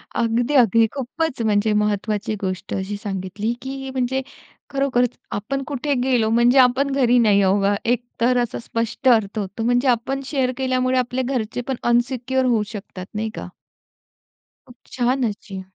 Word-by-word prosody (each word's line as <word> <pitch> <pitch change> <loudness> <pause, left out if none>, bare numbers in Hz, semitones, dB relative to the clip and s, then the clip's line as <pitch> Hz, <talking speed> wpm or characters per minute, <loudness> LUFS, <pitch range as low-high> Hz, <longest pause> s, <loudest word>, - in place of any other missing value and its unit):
अगदी, 235 +4 +1
अगदी. 230 -2 +5
खूपच 280 +1 -3
म्हणजे 210 0 +2
महत्वाची 210 0 0
गोष्ट 185 0 -4
अशी 195 +2 -3
सांगितली, 195 +3 -3
की 270 0 -6
म्हणजे 260 +1 0 0.5
खरोखरच 255 -3 0
आपण 270 +7 -3
कुठे 285 0 -1
गेलो 245 -4 +2
म्हणजे 240 +3 +4
आपण 260 +2 +4
घरी 250 -3 +3
नाही 210 -3 +4
आहो 195 +1 +3
बा. 200 +1 +2
एक 240 +1 +1 0.2
तर 245 +1 +3
असा 235 - -5
स्पष्ट 230 +3 -1
अर्थ 220 -3 +2
होतो. 200 +2 -4
म्हणजे 245 +3 +2
आपण 255 +3 +1
शेअर 265 -3 0
केल्यामुळे 255 -1 +1
आपले 250 +1 -1
घरचेपण 245 0 -2 0.2
अनसिक्युअर 255 +2 +1
होऊ 235 -4 +2
शकतात 195 -3 -8
नाही 220 +1 -2
का? - - -6 1.2
खूप 245 - -16
छान 255 +1 0
अशी. 195 -2 -8
240 Hz, 150 wpm, -21 LUFS, 210-260 Hz, 1.2 s, अगदी